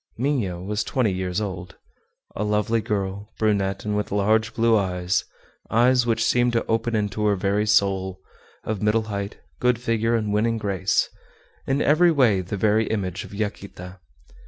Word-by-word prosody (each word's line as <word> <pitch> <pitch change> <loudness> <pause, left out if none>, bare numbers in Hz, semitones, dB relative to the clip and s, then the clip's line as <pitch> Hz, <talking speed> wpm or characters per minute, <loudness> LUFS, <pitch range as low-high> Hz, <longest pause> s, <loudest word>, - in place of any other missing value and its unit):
Minha 120 -9 -1
was 105 +4 -2
twenty 125 -6 0
years 90 0 -2
old. 95 -3 -5 0.6
A 105 - -2
lovely 105 +2 +1
girl, 100 0 -3
brunette, 100 -3 0
and 105 0 -1
with 105 0 -2
large 110 +3 +1
blue 115 0 +3
eyes, 90 -2 0 0.4
eyes 120 +2 +3
which 115 -1 +1
seemed 120 0 +2
to 115 - +1
open 115 +1 0
into 105 0 -1
her 100 - +3
very 100 +3 0
soul; 95 -3 +1 0.4
of 110 -3 -3
middle 105 +1 +2
height, 100 0 -4 0.2
good 125 -1 +2
figure, 115 -1 0
and 105 -2 -1
winning 115 +2 +1
grace, 100 -3 0 0.6
in 135 +2 +1
every 170 +4 +5
way 120 - +3
the 95 +3 -5
very 110 +2 +2
image 95 -5 -2
of - - -13
Yaquita. 100 -3 -6
105 Hz, 160 wpm, -24 LUFS, 95-115 Hz, 0.6 s, every